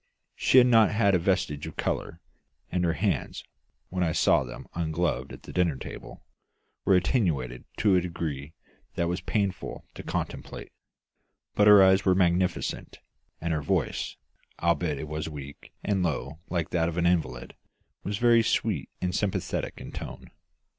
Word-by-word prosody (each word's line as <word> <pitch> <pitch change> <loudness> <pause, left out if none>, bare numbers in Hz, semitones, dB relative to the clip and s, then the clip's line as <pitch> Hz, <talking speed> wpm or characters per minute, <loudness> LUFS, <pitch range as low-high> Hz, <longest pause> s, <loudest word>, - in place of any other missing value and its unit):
She - - +3
had 125 - +9
not 115 -3 +6 0.2
a 90 - +4
vestige 90 -5 0
of - - -8
colour, 85 +1 -3 0.5
and 90 -1 0
her 85 -2 +2
hands, - - -1 0.5
when 90 0 -1
I 80 -2 +1
saw - - +4
them - - -9
ungloved 80 -5 -1
at - - -11
the - - -10
dinner 85 -5 +2
table, 65 - -9 0.6
were 95 - +5
attenuated 85 - 0
to 100 -3 +4
a - - +3
degree 80 -4 -5 0.4
that 85 - 0
was 90 +2 -2
painful 100 -3 -2
to - - -8
contemplate; - - -5 0.8
but 105 - +4
her 105 -2 +9
eyes 95 +1 +5
were 95 -1 +4
magnificent, 90 0 0 0.4
and 85 0 -1
her 75 - -1
voice, 70 - -1 0.4
albeit 85 -3 +1
it 75 - -5
was 75 +1 -4
weak 70 -2 -10
and 100 -2 +1
low 75 -3 -2
like 85 -3 -2
that 85 -1 +1
of 85 - -6
an 85 - +1
invalid, 80 -9 0 0.5
was 100 0 -2
very 120 0 +5
sweet 110 -7 0
and 90 0 -1
sympathetic 105 -2 -2
in - - -8
tone. - - -8
85 Hz, 160 wpm, -27 LUFS, 80-95 Hz, 0.8 s, had